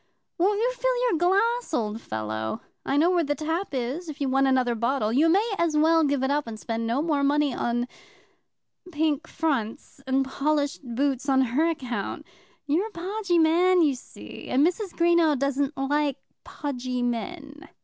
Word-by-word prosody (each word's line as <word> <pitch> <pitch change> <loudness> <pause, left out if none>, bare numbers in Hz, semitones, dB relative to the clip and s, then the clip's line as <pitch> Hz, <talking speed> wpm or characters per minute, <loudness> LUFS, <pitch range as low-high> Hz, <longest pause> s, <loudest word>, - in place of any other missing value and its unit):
Won't 400 +4 +3
you 485 +3 +2
fill - - 0
your 330 - 0
glass, 405 +3 +1
old 220 -2 -2
fellow? 110 - -4 0.2
I 275 - 0
know 335 +5 +4
where 350 -2 +2
the 290 -1 -1
tap 320 +6 -2
is 265 +8 -3
if 300 - -8
you 280 -2 0
want 270 +1 +3
another 255 -2 +2
bottle. 235 -1 0
You 305 +6 +4
may 400 +7 +3
as 330 -3 +1
well 325 +1 +4
give 280 -2 +1
it 265 - +1
up, 290 -2 0
and 220 -1 -7
spend 230 0 -3
no 250 +6 0
more 300 -4 +1
money 290 0 +2
in 240 0 -1 1.0
pink 310 0 0
fronts 275 -3 -3
and 265 +1 +2
polished 290 +1 -1
boots 275 +1 0
on 265 -1 +4
her 320 +5 +3
account. 255 -7 -4 0.4
You're 320 +9 +1
a - - -13
podgy 375 0 -1
man, 345 +2 +4
you 290 -3 +3
see, 105 - -11
and 275 +4 +3
Mrs. 365 +2 -1
Greenow 335 -3 +3
doesn't 275 +2 -1
like 285 +1 0 0.3
podgy 255 -3 -4
men." 290 +6 -5
290 Hz, 175 wpm, -25 LUFS, 260-335 Hz, 1.0 s, know